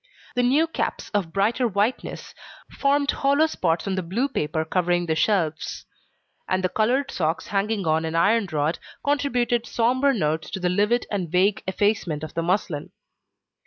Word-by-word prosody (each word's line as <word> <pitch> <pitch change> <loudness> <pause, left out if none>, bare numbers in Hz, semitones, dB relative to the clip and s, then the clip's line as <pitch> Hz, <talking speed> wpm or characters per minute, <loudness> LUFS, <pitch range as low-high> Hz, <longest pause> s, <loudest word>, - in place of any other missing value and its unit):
The 245 - +1
new 270 +6 +3
caps, 325 - -3
of 195 -6 -1
brighter 220 +7 +1
whiteness, 210 +4 -2 0.4
formed 280 0 +2
hollow 280 +3 +3
spots 170 - -1
on 195 - -1
the 185 - -1
blue 195 +11 -1
paper 160 - -2
covering 175 +1 +1
the 160 - 0
shelves. 160 -1 0 0.6
And 185 0 +1
the 185 - +2
coloured 250 +8 +1
socks 160 -2 -1
hanging 200 0 0
on 160 0 +2
an 160 0 -3
iron 205 +5 +3
rod, 155 +2 0 0.3
contributed 245 -5 +1
sombre 255 +4 +2
notes 160 - -1
to - - -4
the 180 -1 0
livid 210 +6 +2
and 190 -5 -2
vague 190 +3 +2
effacement 190 -6 0
of 155 - -6
the 165 - -1
muslin. 170 -3 -1
195 Hz, 160 wpm, -24 LUFS, 165-240 Hz, 0.6 s, new